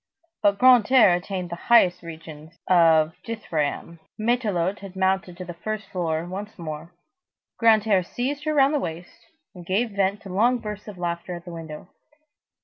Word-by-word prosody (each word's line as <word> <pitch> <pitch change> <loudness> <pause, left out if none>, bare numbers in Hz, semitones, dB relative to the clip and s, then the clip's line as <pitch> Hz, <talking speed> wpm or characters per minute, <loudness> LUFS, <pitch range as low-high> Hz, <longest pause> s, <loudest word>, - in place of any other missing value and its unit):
But 200 -1 +3
Grantaire 250 -3 +6
attained 180 0 -4
to - - -3
the - - -16
highest 190 -7 +5
regions 160 -1 -11
of 165 -3 +4
dithryamb. 165 -7 -3 0.2
Matelote 210 -5 0
had 195 -1 -11
mounted 190 -1 0
to 180 - -7
the 175 - -7
first 215 +5 -5
floor 165 -3 -2
once 200 +4 -7
more, 160 -1 -7 0.7
Grantaire 215 -3 +4
seized 275 - -4
her 310 - 0
round 275 +1 +4
her 295 - +1
waist, 170 -4 -8 0.3
and 180 - -11
gave 205 +7 -1
vent 200 0 -1
to 195 - -9
long 230 +7 +2
bursts 210 -2 -7
of 205 -3 -9
laughter 175 0 -4
at 170 +1 -10
the 175 - -8
window. 160 -1 -9
185 Hz, 165 wpm, -24 LUFS, 170-215 Hz, 0.7 s, Grantaire